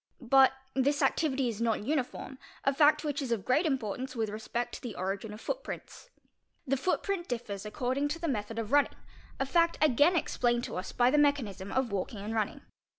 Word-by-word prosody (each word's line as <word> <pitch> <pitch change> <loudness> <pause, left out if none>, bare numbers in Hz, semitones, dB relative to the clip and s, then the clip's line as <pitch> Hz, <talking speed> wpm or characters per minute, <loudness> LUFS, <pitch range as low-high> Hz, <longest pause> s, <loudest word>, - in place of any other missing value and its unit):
But 265 +1 +5 0.2
this 280 +2 +2
activity 270 -5 +1
is 230 -1 -3
not 225 -3 +1
uniform, 265 0 -3 0.2
a 275 - +3
fact 300 +1 +4
"which 290 -1 -2
is 260 -4 -3
of 210 -5 -1
great 305 +7 +3
importance 255 -1 -2
with 220 -2 -1
respect 220 +3 -3
to - - -7
the 240 -4 -6
origin 195 +3 -3
of 210 - -8
footprints. - - -6 0.6
'The 275 -1 +1
footprint 365 +4 -1
differs 210 -4 -4
according 260 +4 -1
to 305 +3 -3
the 335 - -2
method 225 -4 -2
of 225 -1 -3
running, 290 0 +3 0.4
a 270 - +1
fact 335 +4 +2
again 300 +4 +4
"explained 240 -6 +1
to - - -5
us 185 +1 -4
by 245 +1 +3
the 295 - +4
mechanism 245 -10 +1
of 260 -4 0
walking 200 +2 -3
and 215 +2 -4
running. 215 -2 -1
255 Hz, 195 wpm, -30 LUFS, 220-290 Hz, 0.6 s, But